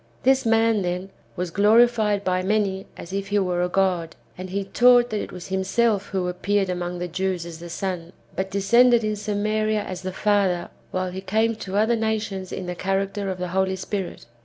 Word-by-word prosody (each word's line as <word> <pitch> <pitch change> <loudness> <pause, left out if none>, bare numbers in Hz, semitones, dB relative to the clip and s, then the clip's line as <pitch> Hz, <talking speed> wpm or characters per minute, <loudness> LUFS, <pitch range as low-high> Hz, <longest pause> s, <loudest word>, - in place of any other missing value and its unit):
^ - - -31
This 265 -1 +3
man, 225 -1 +3
then, 180 +1 -3 0.2
was 180 -2 -3
glorified 215 0 +4
by 185 -1 +1
many 195 -1 0
as 170 - -9
if 195 0 -2
he 205 +1 0
were 180 -3 +1
a 180 - 0
god; 180 -3 0 0.2
and 185 +1 -7
he 200 +2 -2
taught 245 +4 +4
that 210 -1 -1
it - - -7
was 180 0 -9
him 190 0 0
self 210 0 +1
who 185 -2 -2
appeared 195 +2 0
among 175 0 -3
the 175 0 -3
Jews 180 0 -2
as 165 -1 -8
the 170 0 -9
Son, 175 -1 -4 0.2
but 190 0 -2
descended 235 +5 +4
in 215 0 0
Samaria 215 +1 0
as 185 -1 -6
the 185 0 -4
Father, 190 -3 +1 0.2
while 185 0 -2
he 190 +1 -6
came 220 +4 +1
to 195 -2 -4
other 220 +3 +3
nations 215 -4 -2
in 185 - -4
tlie 180 -1 -5
character 195 +1 -1
of 185 - -3
the 180 0 -4
Ploly 190 +1 0
Spirit. 190 - -5
195 Hz, 210 wpm, -24 LUFS, 185-215 Hz, 0.2 s, glorified